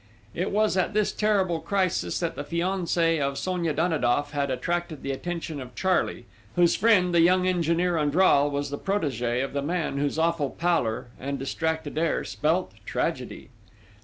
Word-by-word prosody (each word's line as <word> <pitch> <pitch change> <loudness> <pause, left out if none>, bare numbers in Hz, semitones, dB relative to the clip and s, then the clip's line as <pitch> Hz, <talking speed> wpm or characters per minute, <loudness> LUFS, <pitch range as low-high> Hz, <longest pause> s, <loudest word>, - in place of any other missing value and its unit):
It 180 - -1
was 215 -1 +1
at 185 +3 0
this 215 -1 +2
terrible 195 -6 +1
crisis 190 0 0
that 170 - -1
the 145 - -4
fiancé 170 -1 0
of 140 0 -1
Sonia 175 +2 -1
Danidoff 145 -4 +1
had 140 -1 -1
attracted 160 +4 -2
the 140 - -2
attention 160 0 -4
of 125 -1 -10
Charley, 185 -9 0 0.3
whose 175 -1 +4
friend, 185 -6 +3
the 170 - +5
young 180 +2 +4
engineer 175 0 +1
Andral, 145 -1 +4
was 140 0 -3
the 145 - -4
protégé 130 - -1
of 135 - -9
the 140 - -1
man 155 -2 -2
whose 145 +1 -1
awful 165 -3 +1
pallor 145 -10 -1
and 140 +1 -3
distracted 160 +3 -2
air 165 -1 0
spelt 150 - 0
tragedy. - - -3
165 Hz, 160 wpm, -26 LUFS, 140-180 Hz, 0.3 s, the